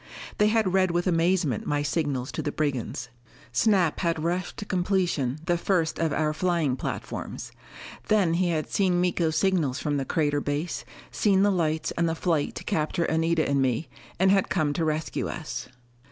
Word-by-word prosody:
They 210 - +5
had 215 -4 +2
read 190 -1 +3
with 175 +1 0
amazement 170 - +1
my 145 0 0
signals 145 -4 -1
to 125 - -3
the 145 - -2
brigands. 130 -4 -2 0.4
Snap 185 - +2
had 165 -3 0
rushed 175 +2 -2
to 205 - -5
completion 175 -8 0
the 175 -1 +1
first 170 -4 0
of 165 -2 +1
our 155 +1 +1
flying 165 -5 +1
platforms. - - -5 0.6
Then 200 -6 +3
he 175 +1 +1
had 155 -2 -1
seen 185 -3 +1
Miko's 170 -3 +1
signals 165 -9 +1
from 145 0 -1
the 135 - -2
crater 145 0 +1
base, 145 +4 -3 0.3
seen 195 -2 +3
the 205 - +4
lights 160 -3 0
and 170 -1 0
the 165 - -1
fight 160 -4 0
to - - -6
capture 155 +2 0
Anita 160 0 +1
and 140 -1 +2
me, 130 +3 0 0.3
and 190 +1 +5
had 195 -1 +3
come 155 -3 +1
to 165 - -1
rescue 155 0 -1
us. 125 -8 -5
165 Hz, 180 wpm, -26 LUFS, 145-180 Hz, 0.6 s, They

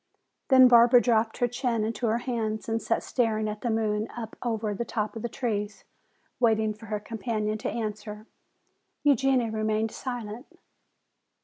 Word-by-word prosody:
Then 260 -2 +8
Barbara 240 0 +7
dropped 225 -2 +1
her 245 - +2
chin 240 -2 -1
into 225 +2 -2
her 225 +1 +2
hands 225 -3 -3
and 225 0 -1
sat 230 - -1
staring 220 -3 0
at 210 0 -5
the 240 - -1
moon 215 -1 0
up 225 -2 -6
over 220 -3 -1
the 205 - -3
top 215 -2 -3
of 225 - -5
the 235 - -3
trees, 210 -4 -3 0.6
waiting 220 -3 +2
for 215 +1 -13
her 210 0 -2
companion 215 -1 -3
to - - -2
answer. 215 -1 -5 0.8
Eugenia 270 -4 +3
remained 215 0 0
silent. 240 -1 -6
225 Hz, 155 wpm, -27 LUFS, 215-240 Hz, 0.8 s, Then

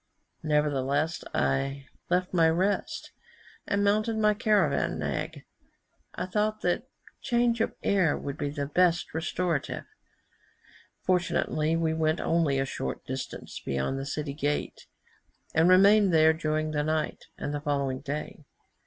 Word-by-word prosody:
Nevertheless 150 +1 0
I 135 0 0 0.2
left 180 +1 0
my 165 -2 +5
rest, 185 +5 -1 0.6
and 200 0 +1
mounted 215 +2 +2
my 210 -1 +4
caravan 210 -2 +1
nag; - - -3 0.7
I - - -2
thought 215 +3 -1
that 180 +9 -1 0.3
change 235 -1 +1
of - - -1
air 185 -7 +2
would 140 -1 -5
be 145 - -2
the 145 0 -3
best 170 +3 +2
restorative. 165 -1 -2 1.2
Fortunately 170 -3 +1
we 165 -1 +1
went 160 0 +1
only 160 -5 +1
a 135 - +1
short 65 - -5
distance - - -6
beyond 70 - -1
the 135 - -5
city 145 0 -3
gate, 145 0 -3 0.7
and 160 +2 +4
remained 200 +2 +6
there 160 -1 +5
during 155 -1 -1
the 150 -1 0
night 155 0 -2
and 145 - -4
the 145 - -3
following 140 -3 -1
day. 150 +2 -5
160 Hz, 135 wpm, -28 LUFS, 145-185 Hz, 1.2 s, remained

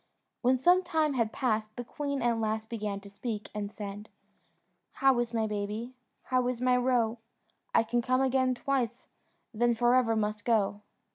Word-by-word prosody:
When 255 +1 +3
some 355 +8 +5
time 315 -4 +1
had 230 -4 0
passed, 215 -4 -1
the 245 - -4
queen 280 +1 -3
at 235 -1 +2
last 220 0 -2
began 210 -3 -3
to 200 - -12
speak, 210 +1 -5
and 205 -1 -4
said 205 0 -7 0.8
"How 270 -2 +3
is 240 -1 -1
my 225 -2 0
baby? 210 +3 -4 0.3
How 255 -1 +1
is 250 -1 -2
my 250 0 +3
roe? 245 -2 +1 0.6
I - - +6
can 240 +1 0
come 255 +2 +1
again 260 -1 +2
twice, 245 -2 -1 0.5
then 240 +2 +2
for 240 +1 +3
ever 245 -3 +3
must 210 -1 -1
go." 210 -3 +1
235 Hz, 170 wpm, -30 LUFS, 215-255 Hz, 0.8 s, I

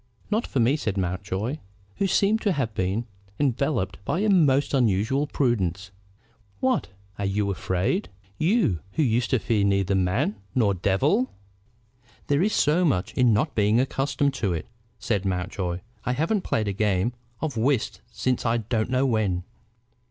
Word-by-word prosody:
"Not 220 +3 +1
for 135 - -1
me," 125 +6 +3
said 105 -8 -2
Mountjoy, 95 - -2 0.4
who 195 - +1
seemed 205 +4 +2
to 205 -4 +2
have 125 -8 -2
been 95 +5 -1 0.3
enveloped 130 -7 0
by 170 - -1
a 215 - +2
most 145 -8 +3
unusual 125 +3 +2
prudence. 100 - -1 0.7
"What! 130 - +1 0.3
are 100 - -1
you 100 +1 0
afraid, 95 - -1 0.3
you 165 - +2
who 160 - +2
used 120 -2 +1
to 130 - +3
fear 105 -1 +1
neither 100 -1 +2
man 95 - +1 0.2
nor 110 -6 +3
devil?" 130 - +1 1.0
"There 145 +2 +3
is 210 +3 +2
so 155 +5 +3
much 130 - +1
in 125 -2 +4
not 130 +8 +1
being 105 +2 +3
accustomed 135 +1 0
to 100 -5 +1
it," 80 - -3 0.3
said 105 -3 -1
Mountjoy. 90 -1 -2 0.2
"I 125 - 0
haven't 165 - 0
played 110 -10 -1
a 100 - -1
game 105 +2 +1 0.3
of 150 -2 -3
whist 120 +1 0
since 125 +1 -1
I 115 0 +2
don't 110 0 -1
knew 130 +1 +2
when." 105 -8 0
115 Hz, 160 wpm, -25 LUFS, 100-145 Hz, 1.0 s, in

